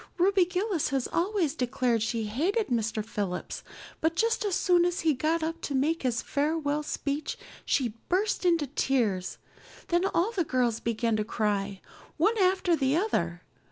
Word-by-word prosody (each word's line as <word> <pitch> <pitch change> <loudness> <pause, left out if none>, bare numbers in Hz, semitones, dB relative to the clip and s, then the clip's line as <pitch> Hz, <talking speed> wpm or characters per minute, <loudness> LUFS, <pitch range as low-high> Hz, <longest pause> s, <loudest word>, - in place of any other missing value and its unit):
Ruby 375 +1 +4
Gillis 365 -1 -1
has 265 -2 0
always 350 -4 0
declared 245 -4 0
she 225 +1 -1
hated 335 - 0
Mr. 225 -3 -1
Phillips, 200 -5 -4 0.4
but 320 +1 +1
just 460 +4 +1
as 400 -4 0
soon 355 -2 +4
as 355 0 0
he 320 -2 +3
got 315 +5 0
up 330 +1 -3
to 280 - -3
make 310 +5 +1
his 240 -3 0
farewell 295 0 0
speech 295 0 -3 0.3
she 245 -5 +1 0.2
burst 385 +4 +1
into 335 -4 +3
tears. 240 -9 0 0.5
Then 350 +2 +2
all 390 +2 +1
the 385 -6 0
girls 245 -6 0
began 230 0 0
to 215 - 0
cry, 205 -3 -1 0.4
one 445 - +3
after 370 -2 +3
the 275 0 +1
other. 175 - -1
295 Hz, 160 wpm, -28 LUFS, 235-355 Hz, 0.5 s, Ruby